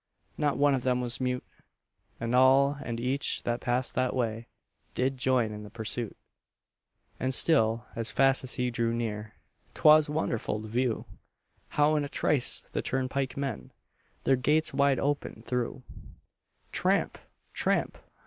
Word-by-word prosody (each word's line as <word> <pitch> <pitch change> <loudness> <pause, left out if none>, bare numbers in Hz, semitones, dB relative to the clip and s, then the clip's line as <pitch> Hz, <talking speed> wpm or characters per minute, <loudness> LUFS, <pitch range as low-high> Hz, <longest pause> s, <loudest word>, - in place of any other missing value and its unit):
Not 145 -2 0
one 145 0 +4
of 130 - 0
them 125 0 +1
was 120 0 -2
mute; 125 0 -1 0.7
And 115 +1 -2
all 135 +2 +5
and 115 -1 -4
each 130 +4 -1
that 120 0 -2
passed 125 +1 -1
that 130 0 0
way 115 -2 -2 0.5
Did 130 +2 0
join 125 -3 +1
in 105 0 -7
the 105 - -9
pursuit. 115 +1 -4 1.0
And 130 0 0
still, 115 -7 +3
as 115 -1 -1
fast 135 0 +3
as 130 - -2
he 125 0 -1
drew 115 -1 0
near, 110 -2 -4 0.4
'Twas 155 -1 +6
wonderful 115 -8 -2
to - - -7
view 120 +1 -1 0.6
How 150 +1 +3
in 150 - 0
a 140 - -5
trice 140 -3 +2
the - - -4
turnpike 130 +1 -2
men 135 -5 -4 0.5
Their 135 - +3
gates 150 +5 +1
wide 140 -1 +3
open 140 -5 -2
threw. 125 +1 -2 0.9
Tramp! - - +1 0.3
tramp! - - 0
125 Hz, 150 wpm, -29 LUFS, 115-140 Hz, 1.0 s, Twas